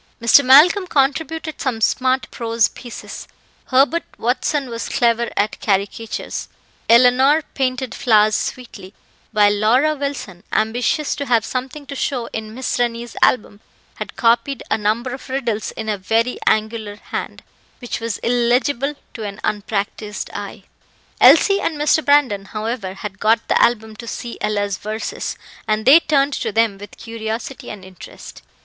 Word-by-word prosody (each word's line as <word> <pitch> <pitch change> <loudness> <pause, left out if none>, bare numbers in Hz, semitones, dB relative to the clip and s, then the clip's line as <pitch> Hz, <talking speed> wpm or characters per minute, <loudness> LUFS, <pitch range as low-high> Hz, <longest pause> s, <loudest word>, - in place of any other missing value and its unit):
Mr. 235 +5 +6
Malcolm 315 +9 +6
contributed 315 +2 -1
some 250 -5 -1
smart 255 +3 +1
prose 230 -2 +1
pieces; 245 -2 -9 0.4
Herbert 275 +6 +3 0.2
Watson 260 +4 -1
was 230 0 -5
clever 235 -1 +1
at 210 +1 0
caricatures; 200 +2 -2 0.4
Eleanor 255 +6 +5
painted 255 -1 -2
flowers 215 -2 +3
sweetly; 205 -6 -5 0.4
while 205 -2 +4
Laura 240 +9 +3
Wilson, 280 - -5
ambitious 245 +7 0
to 285 -1 -4
have 230 -3 +2
something 265 +4 -5
to 280 - -7
show 255 -3 -2
in 220 0 -6
Miss 260 -1 -2
Rennie's 235 -1 -2
album, 210 -3 +2 0.4
had - - -7
copied 235 +3 +1
a - - +4
number 225 +4 -1
of 265 0 -9
riddles 240 -5 -2
in 220 - -6
a 210 -2 -1
very 225 +6 0
angular 215 -1 0
hand, - - -6 0.3
which 245 - -5
was 230 -2 -3
illegible 245 +4 +1 0.2
to 225 - -8
an 200 -1 -6
unpractised 210 0 -3
eye. - - -7 0.6
Elsie 395 -1 +6
and 315 - -2
Mr. 300 +1 +2
Brandon, 270 -9 +3
however, 215 -2 -4
had 195 -1 -7
got 225 +1 +2
the - - +2
album 220 -2 +1
to 235 - -9
see 235 +1 -6
Ella's 205 -2 -1
verses, 215 +1 -4 0.3
and 215 0 0
they 285 +5 +9
turned 285 -3 +1
to - - -2
them 220 -2 +1
with 205 0 -11
curiosity 230 +3 -6
and 200 -3 -9
interest. 185 -2 -12
235 Hz, 145 wpm, -19 LUFS, 215-265 Hz, 0.6 s, they